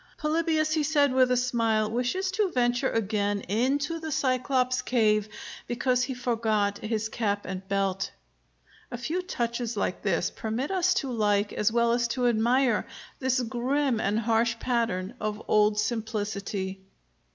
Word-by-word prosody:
"Polybius," 310 0 +1
he 310 - +2
said, 290 -2 +2
with 255 -1 +4
a 250 - +2
smile, 230 -3 +1
"wishes 255 +12 -1
to 395 0 +1
venture 245 -4 +1
again 205 -2 0
into 275 - 0
the 320 -1 -5
Cyclops's 255 -1 +1
cave, 215 -3 +2 0.4
because 250 +1 +1
he 260 -1 -4
forgot 220 -4 0
his 220 0 -2
cap 205 -3 -2
and 190 0 -6
belt." 195 -1 0 0.8
A 240 - -5
few 310 +10 -2
touches 235 - -3
like 190 - -1
this 180 -1 0
permit 230 +7 -3
us 370 -1 +2
to 275 -7 -1
like, 205 -3 +1
as 210 +1 +1
well 235 0 +2
as 235 0 +2
to 250 +1 -1
admire, 240 +1 +2 0.3
this 260 -1 +1
grim 250 +2 0
and 210 0 +1
harsh 230 +1 +1
pattern 230 -5 -1
of 210 -1 -3
old 210 0 +3
simplicity. 210 -4 -3
235 Hz, 150 wpm, -27 LUFS, 210-260 Hz, 0.8 s, with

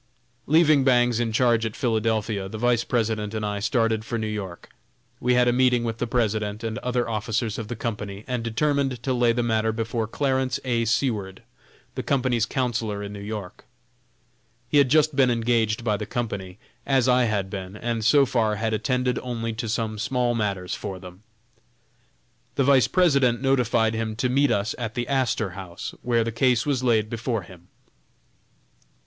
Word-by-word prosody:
Leaving 155 -2 +5
Bangs 120 -3 +3
in 115 -2 0
charge 115 0 +2
at 110 -2 -3
Philadelphia, 110 -4 -1
the 110 - -6
Vice 120 0 +2
President 110 -3 -1
and 110 -1 -2
I 105 -1 -2
started 115 -1 +1
for 115 +1 -3
New 110 - -2
York. 100 -5 -6 0.5
We 125 0 +2
had 125 0 +4
a 120 - +3
meeting 125 -1 +3
with 115 -1 -3
the 120 - -1
President 110 -2 -1
and 110 -1 -3
other 125 -1 -1
officers 110 0 -2
of 110 - -5
the 120 - -4
Company, 105 -3 -5
and 125 -2 -2
determined 135 +1 0
to 130 - 0
lay 120 -1 +3
the 120 +1 0
matter 110 -1 +1
before 115 0 -2
Clarence 130 +1 0
A. 120 -2 +1
Seward, 105 -5 -1 0.5
the - - -3
Company's 125 -4 +1
counsellor 115 -6 -2
in 100 0 -6
New 100 - -7
York. 105 -2 -7 1.1
He 145 - +5
had 140 -2 +4
just 155 +1 +3
been 130 -2 +4
engaged 115 -2 +1
by 105 -3 +1
the - - -5
Company, 100 -6 -4 0.3
as 130 -3 +2
I 125 -1 +4
had 100 -4 -1
been, 95 -1 -6
and 115 0 -2
so 140 +5 +5
far 115 -4 +1
had 110 +1 -1
attended 125 +3 0
only 115 -2 -4
to 115 0 -4
some 110 -1 -2
small 125 +1 0
matters 100 -5 -2
for 95 - -5
them. 90 +1 -12 1.3
The 135 - +2
Vice 135 -1 +5
President 140 -10 +3
notified 125 -4 +2
him 110 -1 -3
to 125 +3 0
meet 140 +2 +3
us 105 -1 0
at 115 -2 -4
the 120 -1 -2
Astor 130 -7 0
House, 90 -2 -7
where 120 -2 +1
the 115 - -3
case 120 0 +2
was 135 -3 0
laid 110 -4 +2
before 115 -1 -3
him. 90 -1 -15
115 Hz, 180 wpm, -24 LUFS, 110-125 Hz, 1.3 s, Leaving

